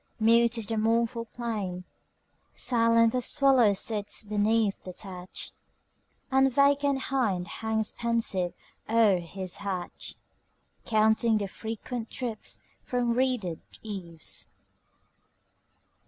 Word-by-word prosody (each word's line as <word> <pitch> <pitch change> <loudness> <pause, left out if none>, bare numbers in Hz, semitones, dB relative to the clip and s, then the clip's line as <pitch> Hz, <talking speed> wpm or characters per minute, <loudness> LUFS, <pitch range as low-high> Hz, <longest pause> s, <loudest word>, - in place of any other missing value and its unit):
Mute 230 +1 +4
is 225 - -2
the 225 +2 -2
mournful 230 +1 +1
plain; 210 -7 -4 0.7
Silent 230 -1 +4
the 250 - 0
swallow 265 -5 +4
sits 205 +1 -1
beneath 210 0 +1
the 185 - -7
thatch, 185 -1 -7 0.8
And 265 0 +4
vacant 280 +1 +3 0.2
hind 200 -9 +1
hangs 220 +1 -1
pensive 230 -7 -1 0.3
o'er 220 -5 +4
his 185 +1 -4
hatch, 190 -3 -5 0.7
Counting 220 +1 +3
the 200 -1 -2
frequent 225 +3 -6
drips 240 -4 -5 0.3
from 245 -1 0
reeded 240 -9 0 0.2
eaves. 180 -7 -4
225 Hz, 100 wpm, -28 LUFS, 200-235 Hz, 0.8 s, Mute